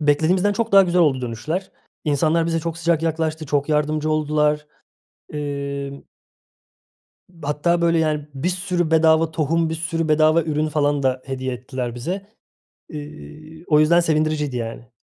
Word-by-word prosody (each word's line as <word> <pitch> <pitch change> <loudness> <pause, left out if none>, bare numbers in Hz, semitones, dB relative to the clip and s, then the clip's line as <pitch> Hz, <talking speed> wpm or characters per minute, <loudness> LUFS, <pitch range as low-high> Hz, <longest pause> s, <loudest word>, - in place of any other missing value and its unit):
beklediğimizden 160 +7 +2
çok 225 +1 -2
daha 195 0 +8
güzel 180 0 +2
oldu 140 -6 +3
dönüşler. 150 +11 -4 0.3
İnsanlar 155 +3 +2
bize 165 -1 0
çok 165 0 -4
sıcak 170 -1 +1
yaklaştı, 160 -1 -1
çok 145 +1 0
yardımcı 155 +1 0
oldular. 150 0 +1 0.7
Emm 140 -1 -4 1.4
hatta 150 +4 0
böyle, 170 -1 +3
yani, 155 -2 0
bir 135 +7 -1
sürü 180 -2 -1
bedava 160 0 +4
tohum, 160 +1 0
bir - - -1
sürü 165 0 -2
bedava 155 +2 +4
ürün 155 0 -1
falan 145 -2 +1
da 130 -1 0
hediye 130 -1 -3
ettiler 125 -1 -5
bize. 180 +11 -4 0.6
Eee, 155 +1 -10
o 150 -1 +4
yüzden 170 +3 +5
sevindiriciydi, 155 -4 0
yani. 115 0 -6
155 Hz, 145 wpm, -21 LUFS, 145-165 Hz, 1.4 s, daha